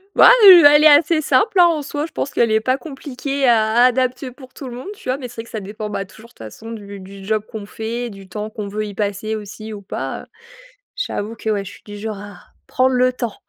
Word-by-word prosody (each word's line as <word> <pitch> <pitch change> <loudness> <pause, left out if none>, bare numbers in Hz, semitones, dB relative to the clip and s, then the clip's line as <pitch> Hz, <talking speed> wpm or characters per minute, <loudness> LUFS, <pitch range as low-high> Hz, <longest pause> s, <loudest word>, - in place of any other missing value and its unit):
Bah, - - +8 0.2
heu, 360 -5 +10
elle 295 +1 +7
est 310 - +9
assez 310 +2 +5
simple, 405 +6 +2
hein, 350 - +8
en 325 -3 0
soi, 290 +1 -4
je 325 - -11
pense 275 - -4
qu'elle 230 -2 +1
est 220 - +3
pas 255 +4 0
compliquée 275 -2 -4
à 220 -2 +3
adapter 255 +1 0
pour 260 0 -15
tout 275 - -9
le 240 - -8
monde, 255 +9 -9
tu - - -14
vois, 255 - 0
mais 260 -3 -7
c'est 240 - -14
vrai 225 - -6
que - - -16
ça 220 - -5
dépend, 210 +2 -7
bah, 205 - -3
toujours 220 +4 -17
de - - -26
toute - - -29
façon 115 - -10
du 200 -3 -9
du 195 +1 -12
job 215 0 -1
qu'on 220 -3 -7
fait, 230 +3 -5
du 195 -2 -12
temps 210 +3 -6
qu'on 210 -1 -7
veut 210 +2 -4
y 205 - -8
passer 205 +2 -3
aussi 215 +1 -8
ou 205 - -8
pas, 135 -8 -5
heu. - - -15 0.7
J'avoue 225 - -4
que, 220 -1 -4
ouais, 205 -2 -1
je 195 - -10
suis 205 - -16
du 205 0 -10
genre 215 -1 -5
à 205 -2 -11 0.3
prendre 260 0 +1
le 255 0 +2
temps. 240 -4 -5
225 Hz, 265 wpm, -19 LUFS, 205-260 Hz, 0.7 s, heu